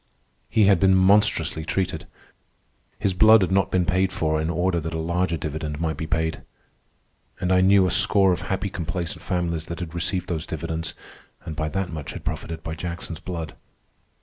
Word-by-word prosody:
He 110 Hz, -, +3 dB
had 95 Hz, -3 st, +5 dB
been 95 Hz, +1 st, +4 dB
monstrously 95 Hz, -3 st, +3 dB
treated. 95 Hz, +3 st, -2 dB, 0.9 s
His 95 Hz, -, 0 dB
blood 110 Hz, +2 st, +6 dB
had 95 Hz, -, -1 dB
not 95 Hz, 0 st, +2 dB
been 90 Hz, -2 st, +1 dB
paid 95 Hz, +1 st, +1 dB
for 80 Hz, -3 st, 0 dB
in 80 Hz, -, -2 dB
order 90 Hz, +1 st, 0 dB
that 80 Hz, 0 st, -5 dB
a -, -, -2 dB
larger 85 Hz, +1 st, 0 dB
dividend 75 Hz, -1 st, -4 dB
might 80 Hz, -3 st, -2 dB
be 80 Hz, -, -4 dB
paid. 80 Hz, -1 st, -1 dB, 1.0 s
And 90 Hz, -, -1 dB
I 90 Hz, 0 st, +4 dB
knew 95 Hz, 0 st, +5 dB
a 90 Hz, -, +1 dB
score 95 Hz, -3 st, +5 dB
of -, -, -4 dB
happy 95 Hz, +1 st, -2 dB
complacent 85 Hz, 0 st, -4 dB
families 85 Hz, -2 st, -2 dB
that 85 Hz, -1 st, -6 dB
had 85 Hz, -3 st, -6 dB
received 90 Hz, +2 st, -1 dB
those 80 Hz, -3 st, -3 dB
dividends 80 Hz, 0 st, -4 dB, 0.5 s
and 80 Hz, -, -5 dB
by 80 Hz, 0 st, -2 dB
that 95 Hz, 0 st, -3 dB
much 75 Hz, -3 st, -6 dB
had 85 Hz, -4 st, -9 dB
profited 80 Hz, +1 st, -4 dB
by 80 Hz, -, -4 dB
Jackson's 85 Hz, -1 st, -6 dB
blood. 85 Hz, -4 st, -6 dB
85 Hz, 185 wpm, -24 LUFS, 80-95 Hz, 1.0 s, blood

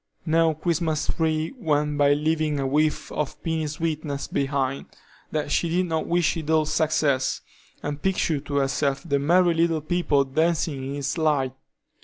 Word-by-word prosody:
No 165 Hz, -1 st, +3 dB
Christmas 160 Hz, -1 st, -1 dB
tree 160 Hz, 0 st, 0 dB
went 150 Hz, -5 st, 0 dB
by 145 Hz, 0 st, +5 dB
leaving 155 Hz, 0 st, 0 dB
a 135 Hz, -, -1 dB
whiff 150 Hz, +3 st, 0 dB
of 150 Hz, -3 st, -3 dB
piny 160 Hz, -2 st, -1 dB
sweetness 150 Hz, -2 st, -3 dB
behind, 135 Hz, -1 st, -1 dB, 0.4 s
that 150 Hz, -2 st, -2 dB
she 170 Hz, -, +1 dB
did 180 Hz, +2 st, +1 dB
not 160 Hz, -2 st, -2 dB
wish 175 Hz, -1 st, +2 dB
it 160 Hz, -2 st, -5 dB
all 160 Hz, -1 st, +3 dB
success, 155 Hz, -3 st, +1 dB, 0.4 s
and 145 Hz, 0 st, -4 dB
picture 180 Hz, -5 st, +1 dB
to 140 Hz, 0 st, -6 dB
herself 140 Hz, 0 st, 0 dB
the 140 Hz, 0 st, +1 dB
merry 175 Hz, +4 st, +4 dB
little 165 Hz, -1 st, +2 dB
people 155 Hz, -3 st, +1 dB
dancing 155 Hz, 0 st, 0 dB
in 135 Hz, +1 st, -4 dB
its 145 Hz, +4 st, -2 dB
light. 145 Hz, -5 st, +1 dB
155 Hz, 160 wpm, -24 LUFS, 140-165 Hz, 0.4 s, by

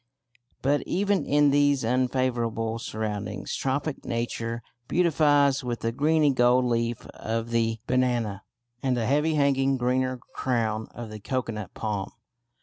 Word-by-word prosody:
But 145 Hz, +2 st, +2 dB
even 200 Hz, +1 st, +1 dB
in 145 Hz, 0 st, +4 dB
these 145 Hz, -2 st, +3 dB
unfavourable 120 Hz, -2 st, 0 dB
surroundings 105 Hz, -3 st, -4 dB
tropic 140 Hz, +2 st, -2 dB
Nature 115 Hz, 0 st, -3 dB, 0.2 s
beautifies 145 Hz, -5 st, +3 dB
with 120 Hz, -2 st, -3 dB
the 115 Hz, -, 0 dB
greeny 150 Hz, +2 st, +3 dB
gold 125 Hz, 0 st, +4 dB
leaf 115 Hz, -1 st, -1 dB
of 115 Hz, +1 st, -3 dB
the 115 Hz, -1 st, +1 dB
banana 120 Hz, -5 st, 0 dB, 0.4 s
and 130 Hz, -2 st, +1 dB
the 115 Hz, -, 0 dB
heavy 150 Hz, +5 st, +2 dB
hanging 135 Hz, -2 st, +2 dB
greener 130 Hz, +1 st, 0 dB, 0.2 s
crown 110 Hz, -4 st, -1 dB
of 120 Hz, -2 st, -7 dB
the 110 Hz, -, -7 dB
cocoanut 115 Hz, -2 st, -4 dB
palm. 105 Hz, -3 st, -3 dB
125 Hz, 130 wpm, -26 LUFS, 115-140 Hz, 0.4 s, in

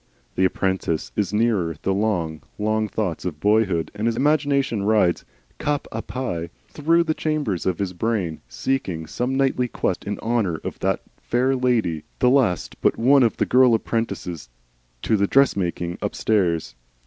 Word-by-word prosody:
The 95 Hz, -, +2 dB
apprentice 95 Hz, -3 st, -1 dB
is 105 Hz, -4 st, 0 dB
nearer 105 Hz, -7 st, +1 dB
the 95 Hz, -, +1 dB
long 90 Hz, -7 st, -1 dB, 0.2 s
long 110 Hz, +1 st, 0 dB
thoughts 100 Hz, -6 st, -3 dB
of 80 Hz, -5 st, -4 dB
boyhood, 100 Hz, -4 st, +2 dB
and 105 Hz, +2 st, -2 dB
his 115 Hz, -, +1 dB
imagination 140 Hz, -4 st, +1 dB
rides 100 Hz, -4 st, +2 dB, 0.3 s
cap 145 Hz, -1 st, -1 dB
a 115 Hz, -, -3 dB
pie 90 Hz, -12 st, -4 dB, 0.2 s
through 165 Hz, +3 st, +2 dB
the 160 Hz, -1 st, 0 dB
chambers 150 Hz, -, -1 dB
of 90 Hz, -3 st, +1 dB
his 95 Hz, -2 st, -2 dB
brain, 90 Hz, -5 st, -2 dB
seeking 80 Hz, -, -2 dB
some 125 Hz, +11 st, -2 dB
knightly 135 Hz, -2 st, +1 dB
quest 95 Hz, -, -2 dB
in 100 Hz, -1 st, -3 dB
honour 110 Hz, -7 st, 0 dB
of -, -, -6 dB
that -, -, 0 dB, 0.2 s
Fair 130 Hz, +2 st, +1 dB
Lady, 115 Hz, -, +1 dB
the 125 Hz, -, +3 dB
last 125 Hz, -10 st, +1 dB
but -, -, +2 dB
one 135 Hz, +4 st, +5 dB
of 115 Hz, -3 st, +2 dB
the -, -, +1 dB
girl 125 Hz, -2 st, +5 dB
apprentices 100 Hz, -, -3 dB, 0.5 s
to 110 Hz, -, +2 dB
the 100 Hz, -1 st, +2 dB
dress 135 Hz, +4 st, +4 dB
making 85 Hz, -2 st, -2 dB
upstairs. 85 Hz, -, 0 dB
110 Hz, 160 wpm, -23 LUFS, 90-125 Hz, 0.5 s, one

